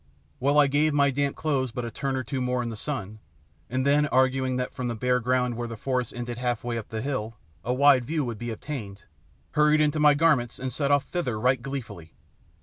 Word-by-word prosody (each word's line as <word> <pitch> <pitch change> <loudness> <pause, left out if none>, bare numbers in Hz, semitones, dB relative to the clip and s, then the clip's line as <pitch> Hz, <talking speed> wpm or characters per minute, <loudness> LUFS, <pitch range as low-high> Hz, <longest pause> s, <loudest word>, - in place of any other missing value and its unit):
Well, 140 +3 +2
I 150 - +7
gave 145 +2 +2
my 140 -1 +4
damp 140 +1 -1
clothes 140 -5 0
but 120 +1 -4
a 115 - -5
turn 135 +4 -2
or 130 - -2
two 130 +2 -3
more 125 0 0
in 120 - -3
the 115 - -5
sun, 110 -4 -5 0.5
and 130 +2 -1
then, 145 +1 +3
arguing 130 -1 +2
that 125 0 -3
from 125 - -4
the 120 - -2
bare 125 +3 +1
ground 125 0 0
where 120 0 -4
the 115 -1 -7
forest 125 0 -2
ended 120 0 -5
half 120 -2 -1
way 120 -1 -2
up 115 -2 -5
the 110 0 -4
hill, 115 -5 -3 0.3
a 120 - -1
wide 130 -1 +5
view 155 +1 -1
would 115 -3 -5
be 120 - -4
obtained, 110 -4 -6 0.5
hurried 150 0 +4
into 150 0 +2
my 150 -1 +6
garments 145 -7 +2
and 130 -1 -4
set 140 +1 0
off 145 -1 +3
thither 125 -12 -2
right 125 +1 +2
gleefully. 115 - -7
130 Hz, 230 wpm, -26 LUFS, 120-140 Hz, 0.5 s, I